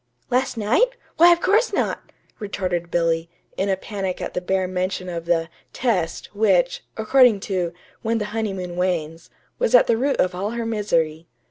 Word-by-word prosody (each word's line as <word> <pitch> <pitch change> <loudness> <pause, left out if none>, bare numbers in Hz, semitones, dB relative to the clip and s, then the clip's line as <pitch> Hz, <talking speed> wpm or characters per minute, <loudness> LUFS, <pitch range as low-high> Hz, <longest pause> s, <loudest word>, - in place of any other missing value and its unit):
"Last 250 -1 +1
night? 255 - +2 0.2
Why, 345 +1 +8
of 340 0 +3
course 435 +5 +3
not," - - -2 0.3
retorted 180 -4 -3
Billy, 165 -1 0 0.3
in 195 +1 -1
a 190 - +1
panic 190 -2 -4
at - - -5
the 180 - -2
bare 190 0 0
mention 185 0 -2
of 170 -1 -5
the 165 -1 +1 0.3
"test" 190 -11 -1
which 190 -5 +2
according 225 0 +5
to 180 -4 -2 0.3
"When 230 0 0
the 210 - -2
Honeymoon 190 -5 -3
Wanes" 165 -3 -2 0.3
was - - +3
at - - +7
the 230 - +2
root 275 +4 +1
of 180 - +1
all 190 +3 -2
her 230 - -2
misery. 170 -8 -1
190 Hz, 170 wpm, -22 LUFS, 175-225 Hz, 0.3 s, Why